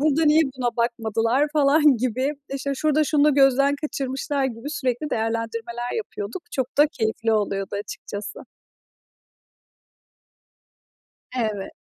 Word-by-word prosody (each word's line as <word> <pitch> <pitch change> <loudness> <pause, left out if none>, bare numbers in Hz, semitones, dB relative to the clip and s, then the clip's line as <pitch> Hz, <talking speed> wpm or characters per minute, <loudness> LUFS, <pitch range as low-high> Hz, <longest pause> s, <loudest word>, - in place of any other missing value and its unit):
burada 310 +2 +3
niye 305 +2 +5
buna 245 -2 -1
bakmadılar, 235 +3 +1
falan, 295 -2 +5
gibi, 255 +4 0 0.2
işte, 275 0 -2
şurada 305 +2 +2
şunu 295 0 +3
da 300 - +6
gözden 275 0 +4
kaçırmışlar 275 -1 -2
gibi 250 +3 -4
sürekli 285 -2 -2
değerlendirmeler 230 +1 -2
yapıyorduk. 290 - -5
Çok 260 +1 -3
da 295 - +7
keyifli 225 -4 -1
oluyordu 200 -2 -1
açıkçası. 205 0 -6 3.0
Evet. 215 -4 -2
255 Hz, 110 wpm, -23 LUFS, 225-290 Hz, 3.0 s, da